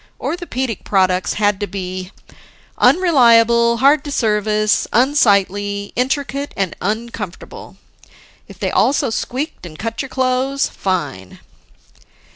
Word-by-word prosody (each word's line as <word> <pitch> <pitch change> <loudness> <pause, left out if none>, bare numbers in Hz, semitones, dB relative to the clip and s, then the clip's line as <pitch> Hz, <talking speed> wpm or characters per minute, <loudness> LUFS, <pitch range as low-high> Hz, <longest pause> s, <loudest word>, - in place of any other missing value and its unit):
Orthopedic 265 - -4
products 185 -2 +1
had 205 -2 +1
to 205 - -3
be: 185 -1 -6 0.7
unreliable, 235 -8 +4
hard 280 +5 +4
to 290 - -5
service, 215 -3 +1
unsightly, 205 -6 +1
intricate, 275 +3 -2
and 195 -4 -1
uncomfortable. 215 -2 -6 0.7
If - - -13
they - - -2
also 275 -2 +2
squeaked 270 +7 -4
and 160 -3 -10
cut 230 +4 -4
your 270 - -7
clothes, 260 +1 0
fine! 145 - -4
225 Hz, 105 wpm, -18 LUFS, 200-265 Hz, 0.7 s, unreliable